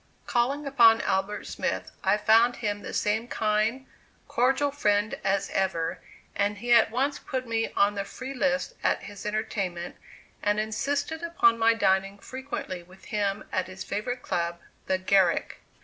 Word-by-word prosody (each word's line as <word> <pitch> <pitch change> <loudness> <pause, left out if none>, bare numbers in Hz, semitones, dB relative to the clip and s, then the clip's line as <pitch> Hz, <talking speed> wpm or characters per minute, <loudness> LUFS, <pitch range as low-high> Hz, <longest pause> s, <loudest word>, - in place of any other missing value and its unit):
Calling 270 +5 0
upon 235 -5 +6
Albert 195 +1 -1
Smith, - - -3
I 195 +2 +3
found 225 +3 +4
him 205 -3 -3
the - - -7
same 220 +3 0
kind, 220 +4 0 0.4
cordial 270 +4 +2
friend 210 -6 +1
as 195 0 0
ever, 170 -4 -1 0.4
and 205 +1 0
he 240 +2 +1
at 235 - +6
once 270 +5 0
put 255 -2 -4
me 225 0 -1
on 200 +1 +3
the 200 -1 -2
free 260 +7 -7
list 275 - 0
at - - +1
his 205 0 -8
entertainment, 195 -5 -3 0.4
and 205 0 +1
insisted 280 +9 -2
upon 285 -9 +3
my 230 0 +4
dining 195 -1 +1
frequently 260 -6 -6
with 180 +2 -18
him 205 -1 -1
at 185 -1 -1
his 185 0 -7
favorite 245 +5 -3
club, 170 0 -2 0.3
the 190 - +2
Garrick. 185 -1 +2
215 Hz, 155 wpm, -27 LUFS, 195-245 Hz, 0.4 s, upon